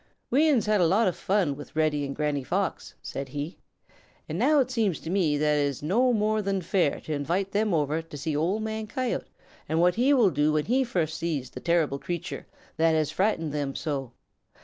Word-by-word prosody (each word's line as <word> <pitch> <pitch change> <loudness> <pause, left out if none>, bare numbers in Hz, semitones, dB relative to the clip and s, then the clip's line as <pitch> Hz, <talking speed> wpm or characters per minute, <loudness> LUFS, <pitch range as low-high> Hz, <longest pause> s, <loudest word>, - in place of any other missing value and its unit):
"We 300 +6 +4
uns 255 -8 +3
have 215 - 0
had 210 -3 +3
a 170 - +5
lot 200 +5 +3
of 180 - 0
fun 185 -8 0
with 145 +2 -11
Reddy 155 -2 +1
and 140 - -5
Granny 150 -2 -1
Fox," - - -2
said 135 0 -5
he, 145 +5 -5 0.7
"and - - -4
now 305 0 +4
it 260 -1 +1
seems 220 -9 0
to 165 - -5
me 170 -7 +2
that 150 0 +2
it 145 - +2
is 140 0 -5
no 235 +11 +3
more 215 -1 +1
than 195 -1 -1
fair 170 -4 +1
to 155 - -4
invite 175 +7 -1
them 210 +1 +1
over 155 -1 +1
to 160 -2 -10
see 145 +2 -2
Old 180 +8 0
Man 220 0 -3
Coyote 255 +2 -2 0.4
and 160 - +1
what 175 +1 +4
he 250 +5 +2
will 225 -8 +4
do 150 +1 +2
when 150 -1 +1
he 260 +4 +2
first 170 - -2
sees 150 -7 -2
the - - -7
terrible 165 -5 +1
creature 175 +2 -5 0.3
that 165 0 +3
has 155 -1 +1
frightened 165 -3 0
them 145 -2 -3
so. 135 -6 -3
165 Hz, 220 wpm, -27 LUFS, 150-210 Hz, 0.7 s, a